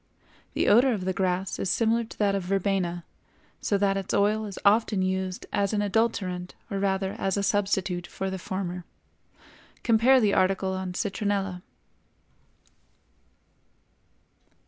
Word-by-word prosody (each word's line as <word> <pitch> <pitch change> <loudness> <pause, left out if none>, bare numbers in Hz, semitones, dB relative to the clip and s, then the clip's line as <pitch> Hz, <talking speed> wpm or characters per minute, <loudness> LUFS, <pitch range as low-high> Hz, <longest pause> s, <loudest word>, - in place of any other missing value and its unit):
The - - +1
odor 245 +4 +5
of 190 -4 -3
the 190 - 0
grass 185 0 -1
is 190 - -1
similar 230 +3 +2
to 225 - -12
that 205 -2 +2
of 195 - 0
verbena, 185 -2 -1 0.6
so 200 - +1
that 195 0 +1
its 195 -1 -2
oil 210 +2 +2
is 200 -2 -7
often 205 -1 +3
used 185 0 -2
as 200 0 +1
an 205 -1 +1
adulterant 195 -4 -1 0.2
or 200 - -1
rather 190 -1 0
as 195 0 0
a 200 - 0
substitute 195 -3 0
for 195 0 -4
the 190 - -4
former. 180 -1 -4 1.0
(Compare 240 +3 +5
the 210 -4 +2
article 190 0 +2
on 185 -1 -4
"Citronella.") 195 -2 -2
195 Hz, 140 wpm, -27 LUFS, 185-205 Hz, 1.0 s, odor